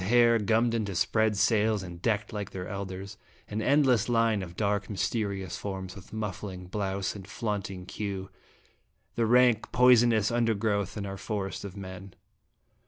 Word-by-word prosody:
101 115 +7 +3
hair 115 -1 +5
gummed 115 +3 +2
into 105 -5 -1
spread 110 +3 +2
sails, 110 -1 +2
and 85 -1 -9
decked 105 -1 0
like 105 -2 -4
their 90 0 -6
elders; 100 0 -6 0.3
an 105 +1 -3
endless 130 -3 +3
line 115 -3 +2
of 85 -2 -8
dark, 100 0 0
mys 105 - -2
terious 100 -5 -3
forms, 95 -2 -5
with 100 - -13
muffling 100 -3 -5
blouse 95 0 -2
and 100 -2 -9
flaunt 105 0 -3
ing 90 -2 -8
queue, 100 -2 -5 0.8
the 115 -1 +1
rank, 120 -1 +4
poisonous 120 -3 +5
undergrowth 110 -4 0
in 100 - -3
our 95 0 -5
forest 100 -1 -4
of 100 0 -8
men. 95 -1 -8
105 Hz, 165 wpm, -28 LUFS, 95-115 Hz, 0.8 s, hair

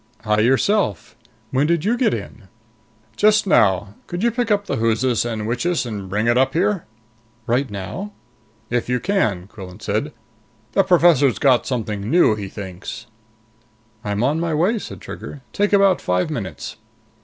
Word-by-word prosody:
"Hi, 105 -1 +1
yourself. 130 - +1 0.4
When 135 +3 +2
did 170 0 +1
you 230 +3 +2
get 245 0 +2
in?" 110 -2 -6 0.7
"Just 215 0 +4
now. 100 - +3
Could 175 +3 -4
you 235 - +3
pick 235 0 -1
up 205 -1 +1
the - - -2
whoosis 115 +2 +1
and 110 -2 -3
whichis 125 +9 -1
and 105 -5 -6
bring 105 +4 0
it 120 +1 +3
up 135 0 +2
here?" 180 +2 0 0.6
"Right 125 +3 0
now?" 105 - -6 0.6
"If 120 0 -1
you 125 0 +1
can," 110 - 0
Quillan 95 -3 -11
said. 110 +9 -2 0.6
"The 195 - +4
professor's 170 - +4
got 130 -4 +3
something 110 -5 -3
new, 170 -7 +5
he 100 -2 -5
thinks." 95 -3 -8 1.0
"I'm 105 +1 -1
on 145 +5 +1
my 165 -2 -1
way," 195 +9 +2
said - - -9
Trigger. 145 - -8
"Take 205 0 +1
about 195 -2 +4
five 90 +11 0
minutes." 100 - -5
125 Hz, 160 wpm, -21 LUFS, 105-175 Hz, 1.0 s, new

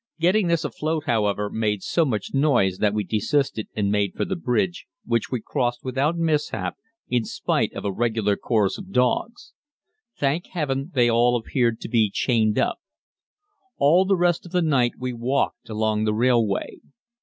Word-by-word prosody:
Getting 180 +4 +3
this 170 -2 +1
afloat, 155 +4 -2
however, 105 -3 0
made 105 -3 -1
so 165 - +1
much 110 -8 -3
noise 125 -10 +2
that 105 0 +1
we 105 - 0
desisted 110 +3 -1
and 100 -2 0
made 100 -2 0
for - - -1
the 190 - -2
bridge, 115 - -1 0.2
which 115 -2 0
we 125 - -2
crossed 120 -1 -1
without 135 +6 0
mishap 155 -3 -1 0.3
in 120 -2 +1
spite - - -1
of - - -6
a 100 - 0
regular 110 -1 0
chorus 105 -3 0
of 195 -1 -10
dogs. 125 - 0 0.6
Thank 145 +5 0
Heaven, 140 -3 -2
they 120 -2 +4
appeared 120 0 +1
to - - -5
be 115 -3 +3
all 100 - -5
chained 110 -4 +1
up. - - 0 1.0
All 160 +7 +5
the 195 0 +2
rest 175 -1 +1
of 175 - -12
the 180 -1 +1
night 130 -6 +2
we 125 0 -4
walked 120 +2 -1
along 110 0 0
the 105 0 +1
railway. 115 -3 +1
120 Hz, 170 wpm, -23 LUFS, 110-150 Hz, 1.0 s, All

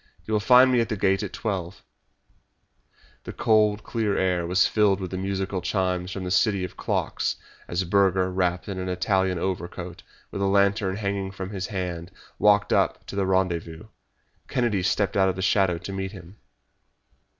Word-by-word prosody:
You 110 - -4
will 105 - +3
find 125 +4 +6
me 125 - +3
at 115 - 0
the 110 - -2
Gate 95 0 +2
at 105 - -4
twelve." 95 -5 -4 1.4
The - - -7
cold, 105 -1 +2
clear 110 -4 -1
air 90 -2 0
was 90 +1 +3
filled 105 -3 +2
with 95 -2 -5
the 95 - -3
musical 95 0 -2
chimes 90 -1 -1
from 95 0 -5
that 90 - -4
city 100 0 +2
of 90 - -6
clocks - - -1 0.3
as 85 +2 -1
Burger, 95 0 +2
wrapped 90 -1 -1
in 95 -2 -4
an 95 0 -3
Italian 95 0 0
overcoat, 90 0 -4 0.3
with 100 - -4
a - - +2
lantern 100 0 +2
hanging 100 -2 -2
from 95 0 -7
his 95 -2 -4
hand, 90 -4 -4 0.3
walked 105 0 +4
up - - +1
to - - -8
the 100 -1 0
rendezvous. 90 -1 -1 0.6
Kennedy 120 -7 0
stepped 95 +1 0
out 95 -1 +4
of 95 - -2
the 95 - -5
shadow 95 -2 +2
to 90 +3 -7
meet 95 +1 -4
him. 95 +1 -12
95 Hz, 180 wpm, -25 LUFS, 90-100 Hz, 1.4 s, find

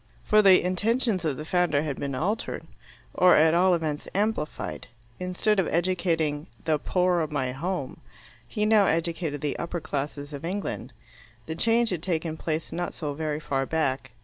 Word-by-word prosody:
For 215 0 +5
the 190 -2 +6
intentions 205 +1 0
of 145 -4 0
the 155 - -6
founder 165 -4 +2
had 145 -4 -3
been 140 -2 -3
altered, 200 - -2 0.5
or 180 0 +6
at 160 +1 +5
all 180 +1 +4
events 155 -3 -3
amplified, 205 -7 -2 0.3
instead 180 +3 +1
of 185 - +2
educating 165 -4 0 0.2
the 155 -2 +2
"poore 180 0 +1
of 155 -1 -3
my 130 -4 -1
home," 160 +2 -4 0.5
he 210 - -1
now 215 -2 +5
educated 165 -3 -1
the 145 -2 -2
upper 170 +1 -3
classes 145 0 -4
of 140 - -7
England. 190 +4 -4 0.5
The 160 - -4
change 230 +6 +2
had 175 -4 -2
taken 165 -3 -2
place 160 0 -3
not 175 +1 -3
so 150 -3 -3
very 155 0 -2
far 135 -3 -1
back. 135 -4 -1
165 Hz, 170 wpm, -26 LUFS, 150-185 Hz, 0.5 s, the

